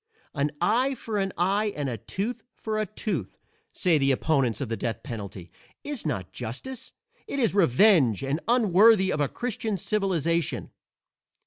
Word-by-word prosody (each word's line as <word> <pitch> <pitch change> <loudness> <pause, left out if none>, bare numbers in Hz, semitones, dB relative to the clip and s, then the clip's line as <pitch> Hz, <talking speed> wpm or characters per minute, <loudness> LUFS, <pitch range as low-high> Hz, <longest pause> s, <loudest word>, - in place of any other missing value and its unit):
"An 145 +1 0
eye 245 +9 +2
for 220 -3 -3
an 195 0 -1
eye 200 +4 +1
and 145 -2 -2
a 125 - -2
tooth 205 - -4
for 215 -1 -3
a 215 - -1
tooth," 180 - -4 0.3
say 165 -4 +2
the 135 0 +2
opponents 135 -3 +1
of 140 - -2
the 115 - -2
death 115 -1 -3
penalty, 100 -6 -7 0.3
"is 285 - -4
not 95 - -3
justice; 135 - -6 0.4
it - - -4
is 235 -5 +2
revenge 165 - +4
and 140 +3 -1
unworthy 215 -3 +5
of 150 - -1
a 140 - +1
Christian 225 -4 -3
civilization." 170 - -1
175 Hz, 155 wpm, -26 LUFS, 135-215 Hz, 0.4 s, unworthy